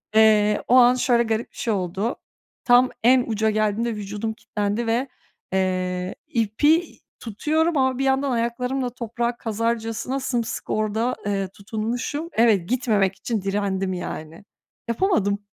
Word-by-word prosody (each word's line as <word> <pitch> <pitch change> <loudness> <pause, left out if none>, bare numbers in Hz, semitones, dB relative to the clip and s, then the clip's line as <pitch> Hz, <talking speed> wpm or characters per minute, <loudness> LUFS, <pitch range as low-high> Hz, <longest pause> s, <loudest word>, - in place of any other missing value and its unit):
Eee, 210 -1 +5
o 250 - +4
an 250 0 +7
şöyle 245 -2 +2
garip 225 0 -2
bir - - -20
şey 230 - -1
oldu, 195 +4 -2 0.5
tam 245 +1 +5
en 250 +2 +5
uca 220 -1 +1
geldiğimde 215 +2 0
vücudum 210 +2 -4
kitlendi 210 +1 -3
ve, 240 +4 +1 0.5
eee, 185 -1 -1
ipi 290 - +1 0.2
tutuyorum 310 +9 0
ama 260 -1 +2
bir 270 - -1
yandan 270 0 +1
ayaklarımla 250 +2 -1
toprağa 235 0 -3
kazarcasına 230 +3 -2
sımsıkı 240 -4 -2
orada, 220 +3 0
eee, 200 -1 -1
tutunmuşum. 230 - -4
Evet, 215 -6 +3
gitmemek 215 -6 +1
için 225 0 -3
direndim 195 -1 -1
yani. 165 -1 -6 0.4
Yapamadım. 220 - +1
225 Hz, 130 wpm, -23 LUFS, 205-245 Hz, 0.5 s, an